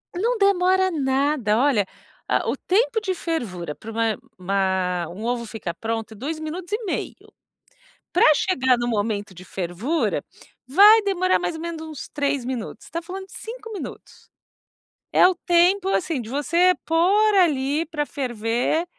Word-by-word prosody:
Não 460 +7 0
demora 375 -2 +3
nada, 270 -6 +1
olha, 245 -7 +3 0.4
a - - +1
o - - 0
tempo 450 +4 +1
de 385 -3 -1
fervura 215 - -4
pra 225 - -9
uma 225 -2 0 0.2
uma 185 -2 0
um 185 +5 -8
ovo 240 0 -1
ficar 210 -6 -5
pronto 225 +5 -4
é - - -13
2 310 +7 -4
minutos 340 +5 -6
e 445 +2 -1
meio. - - -5 0.8
Pra 355 - +4
chegar 260 -9 +2
no 240 0 -2
momento 205 -3 -2
de 180 - -12
fervura, 190 - -2 0.4
vai 410 - +7
demorar 370 -2 +2
mais - - -2
ou 320 - -7
menos 335 -1 -5
uns 310 -3 -8
3 285 -3 -1
minutos, 245 -2 -5
está 335 - -4
falando 380 +3 -7
de - - -20
5 455 0 -8
minutos. 405 - -9 0.8
É - - +7
o 370 - 0
tempo, 360 +2 +3
assim, 335 -8 0
de 220 - -8
você 340 +7 +3
pôr 395 +6 +3
ali 300 -4 +2
pra 300 -2 -2
ferver 245 +4 -1
295 Hz, 160 wpm, -23 LUFS, 225-365 Hz, 0.8 s, vai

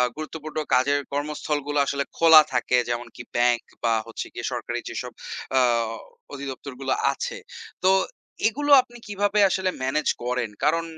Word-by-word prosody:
গুরুত্বপূর্ণ 155 0 -7 0.2
কাজের 140 +3 +3
কর্মস্থলগুলো 145 0 -2
আসলে 140 0 -1
খোলা 160 -2 +9
থাকে, 125 0 +2
যেমন 120 0 -2
কি - - -8
bank 120 0 +3 0.2
বা 115 -1 +3
হচ্ছে 115 - -5
গিয়ে - - -5
সরকারি - - -3
যেসব - - -5 0.5
আ - - +7 0.7
অধিদপ্তরগুলো 135 -1 -4 0.2
আছে। 485 +1 -4 0.5
তো - - +7 0.6
এগুলো 290 +6 -1
আপনি 240 -1 -15
কিভাবে 205 0 0
আসলে 190 0 0
manage 140 +4 +1
করেন? 125 -2 -1
কারণ 165 +3 +2
145 Hz, 135 wpm, -24 LUFS, 125-165 Hz, 0.7 s, খোলা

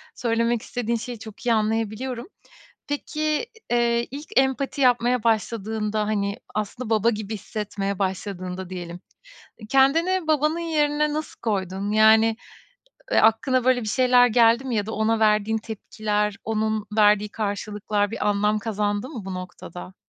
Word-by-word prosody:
söylemek 230 0 0
istediğin 235 -1 -2
şeyi 235 0 -7
çok 220 +2 -11
iyi 235 - +3
anlayabiliyorum. 225 +4 -1 0.6
Peki, 305 +5 -2 0.2
eee, 235 0 +2
ilk 290 +3 -7
empati 270 +1 +1
yapmaya 245 -1 +3
başladığında 215 -1 0
hani 200 -1 -1 0.2
aslında 215 +3 -3
baba 225 +1 +3
gibi 215 -1 -4
hissetmeye 200 -1 -4
başladığında 185 -1 -3
diyelim, 175 -1 -7 0.7
kendini 325 +7 +3
babanın 305 +2 +2
yerine 300 -2 +1
nasıl 310 +1 -5
koydun? 195 -2 -2
Yani, 220 +1 +5 0.8
eee, - - +4
aklına 240 +3 +3
böyle 255 -1 +3
bir 215 - -4
şeyler 250 +1 +5
geldi 235 +2 +4
mi 255 -3 -2
ya 205 -1 0
da 220 - -5
ona 220 +1 +1
verdiğin 215 0 +3
tepkiler, 210 -1 -2
onun 220 -1 -1
verdiği 210 0 +5
karşılıklar 205 -1 -2
bir 215 -2 -1
anlam 210 +1 +2
kazandı 205 +1 -2
mı 240 -10 -7
bu 190 -1 -5
noktada? 180 0 -8
220 Hz, 135 wpm, -24 LUFS, 210-245 Hz, 0.8 s, Yani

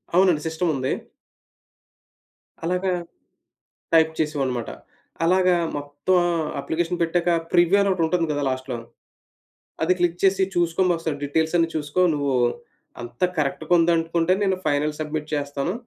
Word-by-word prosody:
అవునండి. 180 -5 +4
సిస్టముంది. 160 -5 -1 1.7
అలాగా 180 +2 0 1.0
టైప్ 160 -1 +5
చేసేవాడినిమాట. 135 -6 -1 0.5
అలాగా 185 +1 +4 0.2
మొత్తం 145 +6 0 0.4
అప్లికేషన్ 175 +2 -2
పెట్టాక, 170 +1 +1 0.2
ప్రివ్యూ 175 +3 +4
అనొకటుంటంది 175 -3 +1
కదా 145 0 -2
లాస్ట్‌లో, 130 -1 -3 1.1
అది 180 +3 +3
క్లిక్ 175 0 0
చేసి 195 0 +4
చూసుకోండొకసారి, 170 -2 +1
డీటెయిల్సన్నీ 160 +3 +1
చూసుకో 150 +3 -1
నువ్వూ, 140 -2 0 0.7
అంత 120 +7 -6
కరక్ట్‌గుందనుకుంటే 165 +3 +2
నేను 190 -1 +1
ఫైనల్ 150 +1 0
సబ్మిట్ 155 0 -3
చేస్తాను, 145 +4 -2
165 Hz, 100 wpm, -23 LUFS, 145-175 Hz, 1.7 s, టైప్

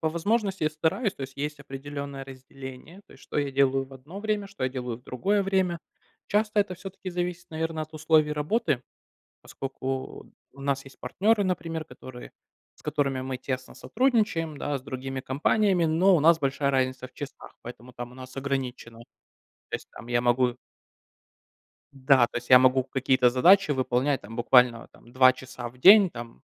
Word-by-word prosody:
по 160 - +1
возможности 195 +4 -1
я 155 - +2
стараюсь. 160 +8 0
То - - -8
есть 135 0 -8
есть 150 +1 -4
определённое 140 0 -7
разделение. 135 +6 -11
То - - -17
есть - - -18
что - - -7
я 145 -1 0
делаю 135 0 +2
в 135 - -18
одно 150 +10 -10
время, 210 -1 -1
что 200 -5 -10
я 130 - 0
делаю 125 -3 -4
в 125 - -20
другое 200 +13 0
время. 190 -3 0 0.5
Часто 210 0 +2
это 200 -2 -2
всё-таки 190 +1 -8
зависит, 175 0 -3
наверно, 160 0 -3
от 155 +1 -10
условий 155 -1 +3
работы. 150 - 0 0.6
Поскольку 135 0 -6 0.2
у 140 - -14
нас 140 -1 -1
есть 135 - -15
партнеры, 205 - +1
например, 165 -3 -3
которые 130 -5 -11 0.5
с - - -20
которыми 140 -3 -1
мы 130 -1 -4
тесно 130 0 -5
сотрудничаем, 210 - 0
да, 145 0 -2
с 130 - -12
другими 130 0 -5
компаниями, 175 +7 +2
но 170 +5 +4
у - - +3
нас 165 +2 +5
большая 140 0 0
разница 130 -1 -1
в 130 - -28
часах, 145 -2 -9
поэтому 120 +1 -11
там 120 0 -7
у 125 - -15
нас 130 0 -11
ограничено. 130 -4 -4 0.7
То - - -4
есть - - -17
там 115 - -12
я 120 0 +1
могу 125 0 +2 1.4
Да, 130 -2 +4
то 120 - -5
есть 120 - -8
я 125 0 +9
могу 130 0 +4
какие-то 130 -1 +2
задачи 170 +7 +5
выполнять 130 +1 0
там 110 +3 -10
буквально 120 -1 +3
там 120 - -19
2 130 0 +6
часа 130 -2 -8
в 125 - -20
день 195 +4 +8
там, 120 - -10
140 Hz, 180 wpm, -26 LUFS, 130-170 Hz, 1.4 s, я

